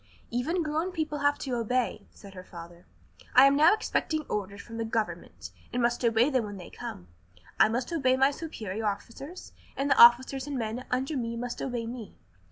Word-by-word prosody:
"Even 310 +9 0
grown 315 +4 -1
people 310 -4 -3
have 285 0 +2
to 265 - -4
obey," 235 -2 -1
said 200 -1 -14
her 185 -1 -9
father. 170 -1 -12 0.5
"I - - +9
am 275 0 +5
now 310 +4 +6
expecting 315 -7 0
orders 200 -5 -4
from 230 -1 -9
the 230 - -1
government, 225 -1 -4 0.2
and 245 - -2
must 240 +1 +1
obey 235 +4 +3
them 255 -4 +2
when 205 -1 -7
they 180 - -10
come. 90 -2 -8 0.5
I - - +6
must 245 +7 -2
obey 260 -5 +2
my 270 +1 +4
superior 220 - -5
officers, 265 - -6 0.2
and 280 +1 0
the - - +6
officers 260 +3 +6
and 285 -2 -3
men 230 +2 -3
under 265 +4 -1
me 235 -3 -2
must 245 0 -5
obey 245 -3 -3
me. 230 -2 -8
245 Hz, 190 wpm, -28 LUFS, 220-280 Hz, 0.5 s, I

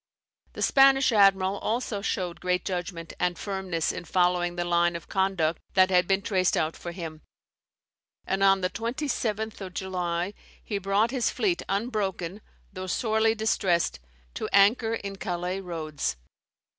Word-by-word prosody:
The - - -3
Spanish 270 -1 +5
admiral 195 -2 +4
also 220 -2 -2
showed 180 -3 -2
great 180 0 -1
judgment 175 -3 -4
and 180 -1 0
firmness 190 -5 -2
in - - -6
following 175 0 +1
the 175 0 -2
line 175 0 +2
of 170 - -7
conduct 190 -4 0
that 185 0 +5
had 180 -1 +4
been 195 0 +1
traced 185 -4 +1
out 160 +1 0
for 175 - -7
him; 165 -3 -7 1.0
and 190 0 -1
on 195 0 +5
the 180 - +1
27th 225 -3 -2
of 185 -2 -7
July 180 0 -2 0.3
he 205 -2 -3
brought 200 +4 +1
his 255 -4 +1
fleet 365 -4 0
unbroken, 200 -3 -2 0.3
though 185 0 -6
sorely 220 +2 +1
distressed, 185 - +1 0.3
to - - -4
anchor 225 +3 +4
in 200 -2 -6
Calais 180 0 -3
roads. 155 - -3
190 Hz, 145 wpm, -27 LUFS, 175-210 Hz, 1.0 s, Spanish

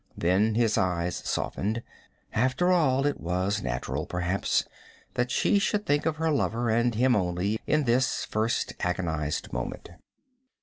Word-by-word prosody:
Then 100 +6 +2
his 115 -2 +2
eyes 90 -1 0
softened. 110 +4 -2 0.5
After 130 +10 +2
all, 140 -6 +3
it 145 - 0
was 95 +4 -1
natural, 65 +3 -3
perhaps, 90 +2 0 0.5
that 125 0 0
she 200 - +3
should 210 +1 0
think 145 +2 +1
of 160 - 0
her 160 0 0
lover, 120 -5 0
and 120 +1 +2
of - - -3
him 125 0 +4
only, 95 +3 0
in 155 -1 +2
this 130 +1 +1
first 110 +2 -1
agonized 80 -4 -2
moment. 60 +7 -5
110 Hz, 145 wpm, -27 LUFS, 90-130 Hz, 0.5 s, him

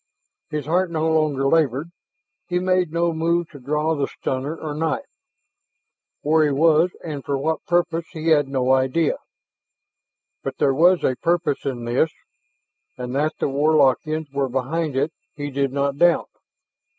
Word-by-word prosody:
His 150 -1 -3
heart 175 +4 +1
no 160 -1 -1
longer 155 -4 +1
labored; 150 +1 +1 0.6
he 180 - 0
made 185 -2 +1
no 170 0 +1
move 170 +1 0
to 145 - -11
draw 150 +4 0
the 145 -3 -1
stunner 135 +4 -3
or 155 -2 -5
knife. 160 +2 -2 1.2
Where 155 +1 +4
he 150 - +3
was 160 +4 +4
and 150 -5 -5
for 140 - -1
what 160 +3 -1
purpose, 170 -1 +1
he 165 -1 -2
had 145 -3 +4
no 130 -1 0
idea. 130 +5 +1 1.2
But - - -5
there 135 - +2
was 175 +5 +4
a 130 - +1
purpose 170 -4 0
in 120 -3 -3
this 125 +7 +2 0.9
and 125 0 -5
that 155 +3 0
the - - -1
Warlockians 150 +1 +2
were 140 -1 0
behind 140 +4 -2
it, 145 +5 0 0.2
he 145 -1 -5
did 140 0 0
not 140 0 -1
doubt. 175 0 +3
155 Hz, 155 wpm, -22 LUFS, 135-165 Hz, 1.2 s, Where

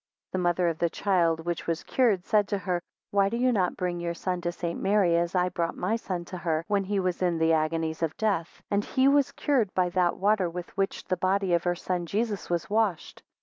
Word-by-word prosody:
9 185 - 0
The - - -1
mother 175 0 +2
of 165 -1 -1
the 170 - +2
child 170 -4 +1
which 175 -1 -3
was 165 0 -1
cured, 215 -9 +1
said 210 -2 +3
to 200 - -1
her, 180 -2 -2 0.3
Why 200 -1 +3
do 235 - -2
you 255 +1 +3
not 190 -6 0
bring 180 -1 -2
your 170 0 -3
son 180 0 -2
to 175 0 -1
St. 170 -1 -4
Mary, 195 -4 +3
as 170 +1 0
I 180 0 +2
brought 170 -2 -2
my 190 +5 0
son 185 -6 -4
to 180 0 -7
her, 165 -2 -1
when 200 -1 +1
he 200 +1 0
was 185 -1 -1
in 175 -2 +1
the 160 0 +3
agonies 160 0 0
of 160 -2 -1
death; 195 -6 -1
and 200 0 +2
he 260 +4 +2
was 280 -1 +4
cure 275 -7 +1
by 180 -1 +2
that 175 -1 +1
water, 200 -2 +2
with 175 +1 -7
which 195 0 -1
the 185 - -1
body 190 -1 +1
of 170 0 +1
her 175 0 +1
son 175 -1 -3
Jesus 210 +1 -2
was 170 -1 -1
washed? 210 -5 -1
180 Hz, 240 wpm, -27 LUFS, 170-200 Hz, 0.3 s, was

